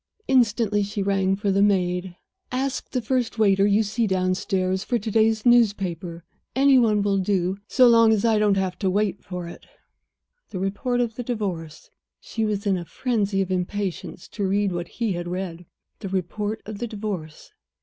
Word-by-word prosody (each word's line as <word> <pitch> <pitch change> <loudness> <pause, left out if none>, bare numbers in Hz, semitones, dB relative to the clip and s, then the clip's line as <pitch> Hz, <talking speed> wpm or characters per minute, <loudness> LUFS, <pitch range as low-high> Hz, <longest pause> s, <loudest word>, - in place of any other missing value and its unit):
Instantly 225 -5 +2
she 200 0 -2
rang 195 -1 +1
for 200 0 -1
the 195 +1 +2
maid. 180 -2 +1 0.4
"Ask 265 +1 -2
the 250 -3 -2
first 240 -1 -1
waiter 200 -2 +4
you 205 +2 +3
see 220 +2 -1
downstairs 185 0 0
for 245 - 0
today's 220 0 +1
newspaper; 190 -8 +2 0.3
any 270 0 +5
one 215 -4 +2
will 200 -1 +1
do, 190 0 0
so 255 -1 +5
long 230 -1 +6
as 220 0 +2
I 220 -2 +3
don't 205 -2 +3 0.2
wait 195 0 0
for 180 -2 -6
it." 170 - -11 0.8
The 190 - -6
report 205 +6 -1
of 230 -2 -2
the 245 - -3
Divorce 185 -10 -5 0.3
she 225 - -4
was 210 -1 -1
in 195 -2 +2
a 170 - -7
frenzy 205 -3 -1
of 185 - -7
impatience 185 -1 -3
to 200 -3 -2
read 200 +1 +1
what 175 -1 -4
he 225 -1 -2
had 175 0 -4
read 175 -1 -5 0.3
the 195 - -6
report 205 +4 -3
of 215 -1 -7
the 240 - -3
Divorce. 200 -8 -6
200 Hz, 170 wpm, -24 LUFS, 185-220 Hz, 0.8 s, long